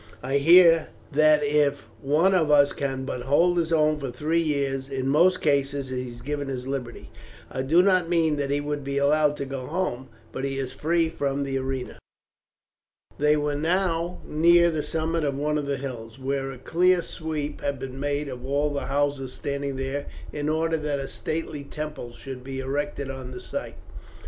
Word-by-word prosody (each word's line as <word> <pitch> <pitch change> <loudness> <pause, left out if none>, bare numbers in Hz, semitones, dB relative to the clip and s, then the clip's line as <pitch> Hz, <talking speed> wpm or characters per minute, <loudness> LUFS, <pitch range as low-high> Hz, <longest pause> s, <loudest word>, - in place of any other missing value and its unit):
I 135 +2 +1
hear 165 +1 +7 0.2
that 155 +1 +5
if 145 -3 +1
one 155 +8 +3
of 165 -5 +2
us 145 -1 +5
can 135 -1 -3
but 125 - -4
hold 170 +7 +3
his 165 -1 -1
own 155 -1 +3
for 135 -2 -4
three 150 +7 0
years, 140 -3 -1
in 135 -1 -2
most 175 +6 +4
cases 140 -2 +1
he 125 -1 -3
is 120 0 -11
given 145 0 -3
his 130 -2 -4
liberty. 130 -3 -5 0.4
I 130 - -2
do 160 +7 +4
not 185 -3 +3
mean 160 -3 +2
that 140 -1 -1
he 145 +1 +1
would 145 -1 -3
be 140 0 -3
allowed 150 +1 +3
to 140 - -3
go 135 -1 -5
home, 135 -9 -2 0.2
but 130 - -5
he 135 0 -2
is 135 -2 -3
free 165 +1 +1
from 140 -3 -2
the 135 -1 -1
arena." 130 -1 -4 1.2
They 150 +1 +4
were 150 0 0
now 170 +2 0
near 170 +2 +5
the 155 -2 -1
summit 160 +2 -1
of 140 -2 -1
one 150 +1 0
of 145 - -4
the 140 -1 -1
hills, 120 -4 -7
where 135 0 -2
a 130 - -9
clear 175 +6 +2
sweep 155 -3 -4
had 140 -1 -1
been 135 0 -7
made 145 +1 -1
of 125 -2 -7
all 145 +2 0
the 140 - -3
houses 140 -2 -1
standing 140 -2 -3
there 135 +2 -3 0.3
in 150 0 -2
order 160 +1 +1
that 150 -2 -2
a 135 -1 -4
stately 155 -1 -4
temple 150 -4 -6
should 130 -1 -8
be 135 0 -5
erected 140 +1 -3
on 130 -1 -7
the 125 -1 -7
site. - - -6
145 Hz, 195 wpm, -25 LUFS, 135-155 Hz, 1.2 s, hear